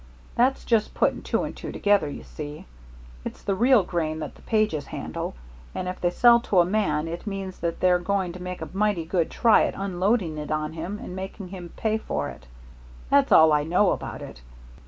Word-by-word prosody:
That's 255 +3 +2
just 225 -3 +1
putting - - +1
two - - -1
and - - -5
two - - -7
together, 205 -7 +2
you - - -7
see. 150 0 -8 0.6
It's - - -7
the 200 - 0
real 240 +2 +4
grain 160 -3 -2
that 160 - -6
the - - -19
Pages 215 -10 0
handle, - - -5 0.4
and 180 - -3
if 185 - -5
they 175 - +3
sell 235 +6 +6
to 210 -5 -1
a 175 - +6
man 170 -6 0
it 170 +6 -6
means 195 -2 -5
that 170 -1 -3
they're 180 -1 +4
going 190 -1 -1
to 180 - -9
make 180 0 -5
a - - -7
mighty 200 -4 +1
good 170 -1 0
try 230 -2 +4
at - - -3
unloading 190 -3 0
it 150 - -6
on 155 0 -2
him 170 +6 -5
and 180 - -8
making 190 0 -7
him 180 -2 -8
pay 220 0 0
for 75 - -3
it. 65 -1 -12 0.6
That's - - +4
all 160 -1 +7
I 150 - +3
know 180 +5 +3
about - - -4
it. 60 - -10
180 Hz, 210 wpm, -25 LUFS, 160-205 Hz, 0.6 s, all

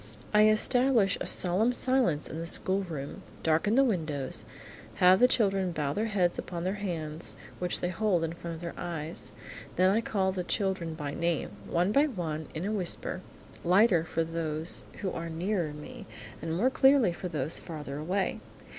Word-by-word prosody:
I 210 0 +7
establish 230 -1 +4
a - - -3
solemn 195 +7 +2
silence 250 - +2
in 160 - -6
the 165 - -4
schoolroom, 175 -7 -1 0.2
darken 165 +7 +2
the 270 - +6
windows, 155 - -2 0.5
have 185 +1 +6
the 250 - +7
children 195 -6 +1
bow 150 -4 -2
their 215 +7 -1
heads 185 -5 +1
upon 175 -1 -5
their 185 +2 0
hands 160 -4 -4 0.2
which 180 -1 -1
they 175 - 0
hold 185 -3 +1
in 165 0 -2
front 170 -1 -6
of 160 - -10
their 170 -1 -5
eyes. 165 -2 -4 0.4
Then 185 +1 +4
I 220 +3 +2
call 190 -4 0
the 185 -1 -3
children 185 -4 -1
by 145 -2 -4
name, 170 -1 -1 0.2
one 175 +4 +2
by 285 +6 +4
one, 160 - -4
in 160 +4 -3
a 205 - -1
whisper, 185 -2 0 0.4
lighter 180 -1 +4
for 165 0 -1
those 160 0 -1 0.2
who 190 - -1
are 165 0 -5
nearer 170 0 -1
me, 200 +9 -10 0.3
and 165 +1 -2
more 250 +7 +2
clearly 265 -9 +5
for 180 - -5
those 155 -2 -2
farther 150 -4 -7
away. 185 +5 -1
180 Hz, 175 wpm, -29 LUFS, 165-205 Hz, 0.5 s, I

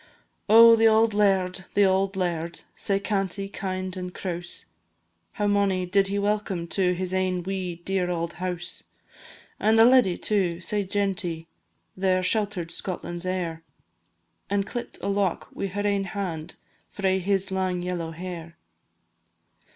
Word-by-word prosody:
Oh, 230 +1 +9
the 225 0 +5
auld 220 0 +4
laird, 190 -2 +2
the 205 - +5
auld 190 +1 +1
laird! 170 -2 -2
Sae 195 -1 +1
canty, 195 -1 -2
kind, 185 -1 -4
and 180 -1 -5
crouse; 175 -1 -4 0.7
How 210 - -1
mony 200 -2 +2
did 195 +2 +3
he 200 +1 -1
welcome 200 -3 -1
to 180 -1 +2
His 185 +1 -2
ain 185 -1 0
wee 185 -2 -3
dear 190 -2 0
auld 170 -1 -2
house! 180 -1 -4 0.7
And 220 +1 +3
the 225 - +8
leddy 245 -8 +5
too, 185 -5 0
sae 205 +3 -1
genty, 190 -4 -1 0.5
There 185 -1 +1
shelter'd 190 -3 +1
Scotland's 175 0 -5
heir, 175 -3 -2 0.9
And 200 -1 +1
clipt 240 +2 -6
a - - -1
lock 200 -2 0
wi' 195 - -3
her 205 +2 -3
ain 200 -1 +1
hand 175 -5 -5 0.3
Frae 190 -1 0
his 195 +1 0
lang 185 -2 -1
yellow 175 -2 -3
hair. 170 0 -8
190 Hz, 145 wpm, -25 LUFS, 180-200 Hz, 0.9 s, Oh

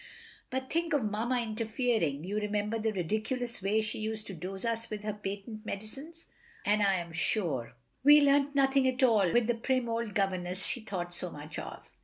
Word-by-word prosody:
But 260 0 -3
think 335 0 0
of 285 -5 +3
Mamma 225 +4 0
interfering! 220 - 0
You 200 +4 -2
remember 210 +1 -1
the 220 0 +1
ridiculous 215 +6 -2
way 205 +3 +2
she 215 0 -4
used 215 0 -2
to 195 - -6
dose 190 +4 -5
us 230 0 -1
with 210 -1 -5
her 215 0 -2
patent 210 +2 -6
medicines; 275 +12 -7 0.4
and 210 +1 +3
I 195 -1 +4
am 170 -2 -4
sure 150 - -1 0.3
we 295 +2 +9
learnt 285 0 +4
nothing 270 -1 +4
at 260 +1 +1
all 210 -8 +5
with 240 -1 +4
the 240 - +2
prim 250 +1 0
old 230 -2 -2
governess 185 -1 0
she 245 - -1
thought 180 -5 -4
so 180 +1 -3
much 150 0 -7
of. - - -8
215 Hz, 190 wpm, -31 LUFS, 195-245 Hz, 0.4 s, we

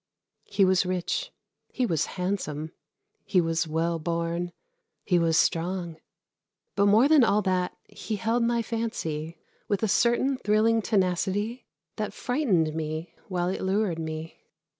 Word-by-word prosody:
He 195 - +3
was 185 -1 +3
rich, 185 - -2 0.4
he 255 - -1
was 160 -9 0
handsome, 160 -5 -2 0.5
he 185 - +2
was 165 -1 0
well 165 +1 0
born, 170 +2 -2 0.5
he 180 -3 +3
was 165 -1 +2
strong, 170 0 0 0.8
but 200 0 +3
more 220 +6 +6
than 300 -3 +6
all 210 -2 +3
that 185 -1 0
he 220 - -5
held 225 +3 0
my 235 0 +1
fancy 165 -9 -3 0.3
with 205 +1 -1
a - - +3
certain 240 +5 +2
thrilling 220 +1 +3
tenacity 205 +3 0 0.3
that 210 -2 -3
frightened 205 - +1
me 155 +1 -4
while 180 -2 -1
it 190 - -3
lured 190 -3 0
me. 160 0 -6
185 Hz, 140 wpm, -27 LUFS, 165-220 Hz, 0.8 s, more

